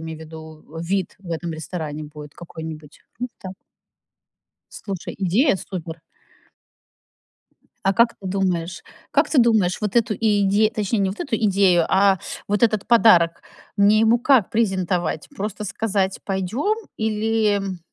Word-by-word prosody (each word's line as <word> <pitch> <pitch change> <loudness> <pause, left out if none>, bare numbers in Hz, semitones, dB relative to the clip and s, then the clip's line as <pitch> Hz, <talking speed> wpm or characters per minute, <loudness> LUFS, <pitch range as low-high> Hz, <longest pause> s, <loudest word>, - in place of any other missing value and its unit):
имею 160 -1 -7
в - - -14
виду, 160 0 -11
вид 185 +1 -2
в 185 -3 -11
этом 165 0 -3
ресторане 155 -1 -5
будет 150 0 -11
какой-нибудь, 160 -3 -9 0.2
ну 250 +1 -3
так. 190 -1 -8 1.2
Слушай, 195 -4 -6
идея 200 - +2
супер. 170 -4 -7 1.9
А 195 - +4
как 235 +3 +4
ты 195 - -7
думаешь 185 -3 -2 0.3
как - - +2
ты 300 - +1
думаешь, 220 -6 +3
вот 210 +2 -2
эту 215 -2 +2
и 210 -2 +1
иде 205 +2 +3
точнее, 215 0 -1
не 195 -1 +1
вот 195 - -8
эту 245 -6 -1
идею, 195 -5 +3
а 195 -1 +4 0.3
вот 205 +3 0
этот 215 -3 +2
подарок, 180 -8 +5 0.3
мне 205 +1 +5
ему 225 +2 +4
как 250 -5 +3
презентовать? 185 -7 -1
Просто 210 -1 -4
сказать: 195 -2 -1
"Пойдём?" 205 - -1 0.2
Или 220 -1 +1
м 195 -2 -4
195 Hz, 145 wpm, -22 LUFS, 170-215 Hz, 1.9 s, подарок